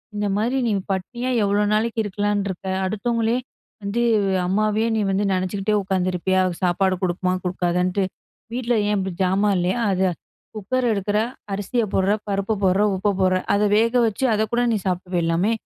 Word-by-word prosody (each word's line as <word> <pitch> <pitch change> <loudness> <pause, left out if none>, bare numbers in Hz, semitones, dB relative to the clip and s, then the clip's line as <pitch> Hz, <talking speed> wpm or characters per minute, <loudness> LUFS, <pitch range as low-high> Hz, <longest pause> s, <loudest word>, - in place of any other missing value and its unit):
இந்த 205 0 -1
மாதிரி 240 +5 0
நீ - - +1 0.2
பட்டினியா 240 +7 -3
எவ்வளோ 205 +1 +2
நாளைக்கு 225 +1 0
இருக்கலாம்ன்னு 205 0 -1
இருக்க? 190 +1 -6 0.2
அடுத்தவங்களே 230 +3 0 0.5
வந்து 200 +4 -1 0.5
அம்மாவையே 215 +3 +1
நீ 220 - +1
வந்து 195 +2 +1
நெனைச்சுக்கிட்டே 190 +3 -1
உட்காந்துருப்பியா? 185 0 0
அது 175 - -3
சாப்பாடு 185 +1 +2
குடுக்குமா 185 0 0
குடுக்காதான்ட்டு? 180 +1 0 0.5
வீட்ல 245 0 -1
ஏன் 210 - +1
இப்படி 190 -1 -2
ஜாமான் 195 +2 +2
இல்லையா? 180 +4 0
அத 190 -1 0 0.5
குக்கர் 245 +5 -1
எடுக்குற, 205 0 0 0.3
அரிசிய 205 +4 -1
போடுற, 190 +1 +2 0.2
பருப்ப 200 +2 -1
போடுற, 190 +1 +3
உப்ப 195 +2 +1
போடுற 185 -1 +3 0.2
அத 205 +1 +2
வேக 230 +2 +2
வச்சு 225 +5 -1
அதக்கூட 220 +3 0
நீ - - +1
சாப்பிட்டு 185 0 -2
போயிரலாமே. 170 +4 +1
200 Hz, 155 wpm, -22 LUFS, 185-215 Hz, 0.5 s, போடுற